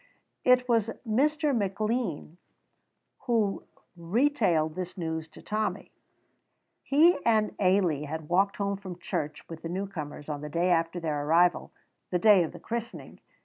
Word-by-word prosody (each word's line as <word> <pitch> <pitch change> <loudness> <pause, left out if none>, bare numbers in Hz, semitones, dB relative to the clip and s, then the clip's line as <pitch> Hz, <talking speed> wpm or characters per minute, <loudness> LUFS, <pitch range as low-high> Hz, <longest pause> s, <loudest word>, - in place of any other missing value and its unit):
It 250 0 +4
was 230 -2 +2 0.2
Mr. 295 +5 +2
McLean 205 -5 -2 0.9
who 220 -5 +1 0.3
retailed 175 - +1
this 180 +2 -6
news 160 -2 -3
to - - -16
Tommy. 215 0 -3 0.9
He 320 +6 +4
and 220 -2 +2
Ailie 185 -6 +2
had 155 +1 -6
walked 195 +4 +2
home 200 -1 -1
from 185 -3 -8
church 150 -3 -4
with 165 -1 -9
the 165 - -5
newcomers 170 -6 -5
on 145 -2 -4
the 150 - -6
day 170 +4 +1
after 165 +1 +1
their 150 -3 -2
arrival, 175 +2 +3 0.4
the 180 - +1
day 200 +1 +6
of 165 - -2
the - - -11
christening. 235 +1 -6
185 Hz, 145 wpm, -28 LUFS, 165-220 Hz, 0.9 s, day